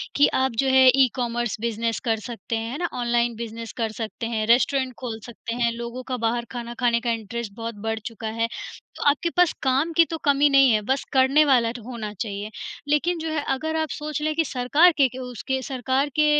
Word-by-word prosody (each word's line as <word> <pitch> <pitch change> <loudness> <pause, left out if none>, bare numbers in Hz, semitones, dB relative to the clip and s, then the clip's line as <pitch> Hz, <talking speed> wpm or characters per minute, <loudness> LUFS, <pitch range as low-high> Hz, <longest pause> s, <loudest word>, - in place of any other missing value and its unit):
कि 285 - +6 0.2
आप 265 - +1
जो - - 0
है 260 0 +6
ई 265 -1 +6
कॉमर्स 240 -3 -2
बिज़नेस 230 0 -1
कर 225 -1 +1
सकते 230 0 -5
हैं, 225 +1 -3
है 280 - -4
ना, 345 -1 -2
ऑनलाइन 240 -1 +1
बिज़नेस 230 0 -6
कर 225 - 0
सकते 220 +1 -5
हैं, 220 -2 -1
रेस्टोरेंट 260 +2 +3
खोल 230 -4 -5
सकते 235 0 -6
हैं। 235 -1 +1
लोगों 235 +2 -6
का - - 0
बाहर 235 +1 -1
खाना 240 -1 -5
खाने 235 -1 +3
का 240 -2 0
इंटरेस्ट 225 -1 -4
बहुत 230 -1 -5
बढ़ 220 0 -1
चुका 225 -1 -6
है, 230 - +2 0.5
तो - - -5
आपके 320 +4 0
पास 355 -2 +5
काम 270 +5 +2
की 335 - +7
तो 325 - -5
कमी 285 0 +4
नहीं 275 -2 +6
है, 215 -1 +3
बस 265 +6 -1
करने 270 +3 +5
वाला 245 -5 +4 0.2
होना 225 -4 -6
चाहिए। 205 0 -5 0.4
लेकिन 330 +4 +1
जो 320 0 -3
है 295 -2 -1
अगर 315 +4 -3
आप 315 -1 -1
सोच 300 0 -4
लें 310 0 0
कि 325 -1 +2
सरकार 275 +8 +4
के 275 -3 +5
के 255 - -10
उसके 255 +1 -3
सरकार 265 +2 -1
के 305 - +4
245 Hz, 220 wpm, -24 LUFS, 230-275 Hz, 0.5 s, की